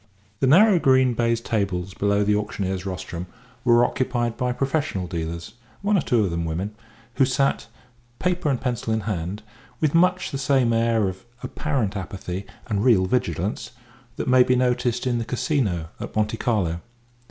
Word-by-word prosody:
The 135 - +2
narrow 185 +6 +6
green 130 -3 +4
baize 115 0 +1
tables 95 -5 -2
below 100 +1 +1
the 105 +1 +2
auctioneer's 95 -2 -2
rostrum 90 -1 -5 0.4
were 120 -1 +5
occupied 120 -3 -1
by 125 0 -1
professional 135 - -1
dealers, 85 +2 -5 0.3
one 205 +1 +2
or 190 - +3
two 120 -6 +2
of 95 - -1
them 85 0 -2
women, 85 +6 -3 0.4
who 135 - +5
sat, 135 +1 0 0.5
paper 180 -4 0
and 135 -3 0
pencil 120 -3 -2
in 110 - 0
hand, 100 0 -4 0.4
with 155 -3 +1
much 180 +2 +3
the 135 - -3
same 135 -4 +2
air 115 -2 +2
of 95 +2 -6 0.2
apparent 130 -10 -2
apathy 95 -1 -5 0.2
and 105 -3 -1
real 110 -7 +5
vigilance 105 +1 -2 0.4
that - - -4
may 130 0 +6
be 125 0 +4
noticed 125 -1 +1
in 120 -2 +1
the - - -1
Casino 100 - 0
at - - -7
Monte 110 +1 0
Carlo. 95 -10 0
115 Hz, 165 wpm, -24 LUFS, 95-130 Hz, 0.5 s, narrow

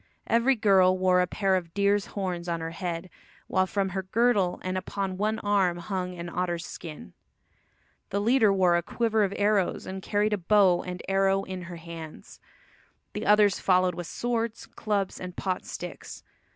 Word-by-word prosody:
Every 235 +4 +3
girl 190 -4 +4
wore 185 -1 +3
a 180 - +1
pair 195 0 +1
of 170 -3 -4
deer's 200 0 +2
horns 180 -3 -3
on 170 -1 -1
her 165 0 -4
head, 170 0 -4 0.4
while 185 0 +1
from 195 0 -1
her 190 +1 -3
girdle 205 -1 +1
and 185 0 -2
upon 190 0 -3
one 215 +3 0
arm 195 -5 +1
hung 180 0 -4
an 170 0 -6
otter's 175 -1 -2
skin. 155 - -9 1.0
The 200 - -1
leader 225 0 +4
wore 185 -3 +3
a 170 - +2
quiver 220 +4 0
of 195 - 0
arrows, 205 -2 +1
and 190 0 -6
carried 210 +2 0
a 205 - 0
bow 190 -1 +4
and 180 -1 -7
arrow 195 0 +2
in 185 -1 -6
her 175 0 -8
hands. 165 -2 -10 0.7
The - - -4
others 210 -1 +5
followed 185 -1 +3
with 175 0 -6
swords, 230 +1 -2
clubs 205 -3 -2
and 180 -1 -7
pot 185 -2 -2
sticks. - - -8
190 Hz, 175 wpm, -27 LUFS, 180-205 Hz, 1.0 s, others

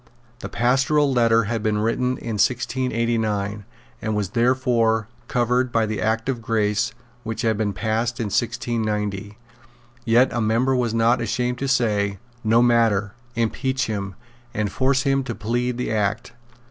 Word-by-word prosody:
The - - -6
Pastoral 135 +4 +2
Letter 115 -2 +4
had 115 +1 -2
been 105 -1 0
written 125 +4 0
in 110 -3 -2
1689, 115 -5 0 0.4
and 110 -1 -2
was 105 -3 -1
therefore 115 -3 +2 0.2
covered 125 +1 +1
by 115 -1 +2
the 110 0 -3
Act 110 +1 0
of 130 -3 -2
Grace 110 0 0 0.3
which 115 0 -4
had 110 -1 +2
been 105 -1 -1
passed 115 +4 -1
in - - 0
1690. 105 -2 -2 0.7
Yet 120 +2 +3
a 120 - 0
member 115 +5 +2
was 120 -3 0
not 115 +2 +3
ashamed 125 +2 -1
to 135 - -2
say, 105 -6 +1 0.3
"No 115 +2 +4
matter: 110 -4 +2 0.2
impeach 130 +3 0
him; 100 -3 -4 0.4
and 105 -2 -1
force 135 +3 +1
him 135 -1 +1
to 120 -3 -5
plead 120 +2 -1
the 125 - -2
Act." 110 +3 -1
115 Hz, 150 wpm, -23 LUFS, 110-125 Hz, 0.7 s, Letter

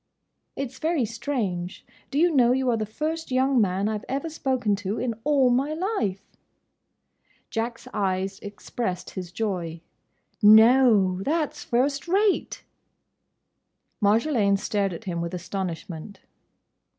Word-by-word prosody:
"It's 265 -2 -5
very 315 -5 +1
strange. 215 -6 -3 0.2
Do 275 - -3
you 345 +3 +4
know, 245 -2 +5
you 260 -1 +1
are - - +2
the 215 -1 -2
first 315 +8 -3
young 260 -1 +3
man 195 0 +1
I 215 -1 -1
've - - -16
ever 275 +5 -2
spoken 255 -8 0
to, 205 +1 -3
in 245 -2 -1
all 275 -4 +3
my 275 +5 +1
life?" 315 - -2 1.3
Jack's 230 +1 -3
eyes 195 -1 -1
expressed 200 -1 -5
his 180 -2 -7
joy. 180 -5 -3 0.6
"No!—that's 220 - +5
first 275 +5 0
rate!" 395 +3 +1 1.4
Marjolaine 210 -1 +3
stared 200 -1 -1
at 170 - -7
him 175 -4 -3
with 170 +1 -4
astonishment. 180 0 -6
225 Hz, 125 wpm, -25 LUFS, 195-270 Hz, 1.4 s, know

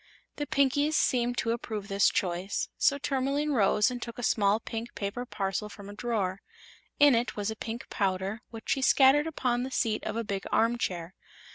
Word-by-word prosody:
The 290 - -3
Pinkies 285 +3 +2
seemed 245 -3 +1
to 230 - 0
approve 220 -3 -4
this 195 0 +3
choice, 180 +1 -2
so 280 - +3
Tourmaline 280 +2 -1
rose 210 -1 +3
and 245 -1 -5
took 235 -1 -7
a 245 - -5
small 205 -1 +3
pink 230 +1 -6
paper 205 +5 -4
parcel 195 0 -2
from 200 -1 -11
a - - -9
drawer. 205 -4 -2 0.6
In 290 -1 +7
it 235 +1 0
was 205 +1 -2
a - - -5
pink 225 +1 -6
powder 195 +2 -1
which 225 -1 -10
she 270 - +1
scattered 275 +3 +5
upon 250 -6 -1
the 255 - -3
seat 225 -4 0
of 215 - -3
a 230 - -1
big 200 -2 -4
armchair. 190 -7 0
230 Hz, 185 wpm, -29 LUFS, 200-255 Hz, 0.6 s, In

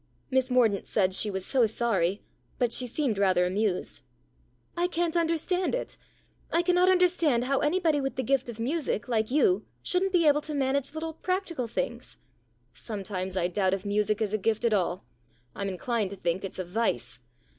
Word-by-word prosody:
Miss 260 0 +2
Mordaunt 235 -6 +2
said 190 -3 +1
she 210 - +2
was 190 -2 -3
so 255 -4 +3
sorry, 205 -4 0 0.3
but 240 -2 +1
she 250 - +3
seemed 240 -4 -1
rather 185 -2 +3
amused. 190 +1 -1 0.4
" - - -37 0.3
I 350 0 +1
can't 345 -1 -1
understand 340 +4 0
it. - - -5 0.6
I 335 - +2
cannot 360 +1 +4
understand 345 -9 +3
how 270 +2 +1
anybody 315 -1 +2
with 270 0 -3
the 260 - -2
gift 265 -2 0
of 230 -1 -8
music, 265 -3 -2
like 220 -3 0
you, 305 +8 +3 0.2
shouldn't 380 +1 +1
be 350 -3 +3
able 295 0 +4
to 300 0 -5
manage 280 +1 0
little 320 0 -4
practical 340 -7 -2
things." 240 +1 -4 0.3
" - - -41 0.2
Sometimes 190 - -5
I 175 -1 +2
doubt 190 +1 +1
if 195 +1 -9
music 210 +1 0
is 210 -1 -3
a 215 - +1
gift 220 +3 0
at 230 - +3
all. 185 -1 0 0.5
I'm 200 -1 -3
inclined 210 +2 -1
to 200 - -7
think 175 0 -2
it's 195 - -6
a 185 - -2
vice. 175 - -2
240 Hz, 190 wpm, -28 LUFS, 200-310 Hz, 0.6 s, cannot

